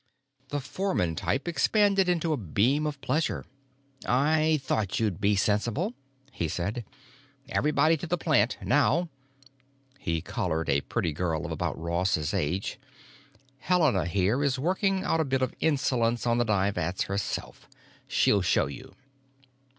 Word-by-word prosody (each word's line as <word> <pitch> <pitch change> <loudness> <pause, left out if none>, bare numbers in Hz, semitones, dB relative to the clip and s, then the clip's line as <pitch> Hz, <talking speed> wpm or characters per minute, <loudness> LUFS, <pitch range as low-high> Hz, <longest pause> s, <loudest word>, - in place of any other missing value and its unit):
The 145 - -2
foreman 140 - -1
type 105 - -1
expanded 195 +2 +3
into 170 -2 +1
a - - -1
beam 120 - +1
of 145 -2 -4
pleasure. 155 +3 -1 0.6
"I 155 +4 +2
thought 105 -7 -1
you'd 105 -4 -1
be 100 +1 +3
sensible," 115 - 0 0.4
he 85 - -2
said. 100 +9 -3 0.7
"Everybody 155 +3 +3
to 170 - -6
the 175 +2 0
plant, 135 -9 +2
now!" 160 +4 +2 0.9
He 80 -8 -1
collared 80 +1 -2
a 70 - +3
pretty 80 +3 -2
girl 80 -1 -2
of - - -5
about - - -2
Ross's 85 -1 0
age. 90 - -2 0.8
"Helena 150 - +2
here 100 +9 +1
is 135 -3 +1
working 190 +6 0
out 165 - +1
a - - +3
bit 135 -2 0
of 130 - -1
insolence 125 -6 +1
on 120 0 +2
the 120 - +2
dye 100 -2 +2
vats 90 0 -2
herself. 100 +1 -4 0.4
She'll 100 - +3
show 90 - +2
you." 70 0 -9
120 Hz, 145 wpm, -28 LUFS, 95-155 Hz, 0.9 s, expanded